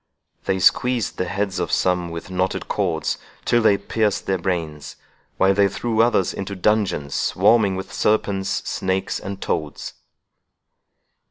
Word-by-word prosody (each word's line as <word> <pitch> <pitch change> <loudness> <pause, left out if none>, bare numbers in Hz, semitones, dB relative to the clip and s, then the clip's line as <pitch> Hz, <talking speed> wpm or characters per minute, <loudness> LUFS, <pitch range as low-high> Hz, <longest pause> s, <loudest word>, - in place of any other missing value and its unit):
They 95 - +1
squeezed 120 +5 +2
the 90 - +1
heads 100 -1 -2
of - - -2
some 90 -1 +1
with 85 +2 -7
knotted 95 +1 -1
cords - - -1 0.3
till 120 - +3
they 105 -3 +4
pierced 105 +1 -1
their 95 -1 0
brains, 80 -5 -3 0.4
while 95 +1 +4
they 100 0 +4
threw 115 +3 0
others 115 -6 +2
into 100 +1 -5
dungeons 95 -8 0
swarming 105 -5 +3
with 95 0 -6
serpents, 100 -2 0
snakes, 95 0 -1
and 95 0 -6
toads." 75 -6 -3
95 Hz, 140 wpm, -22 LUFS, 90-105 Hz, 0.4 s, they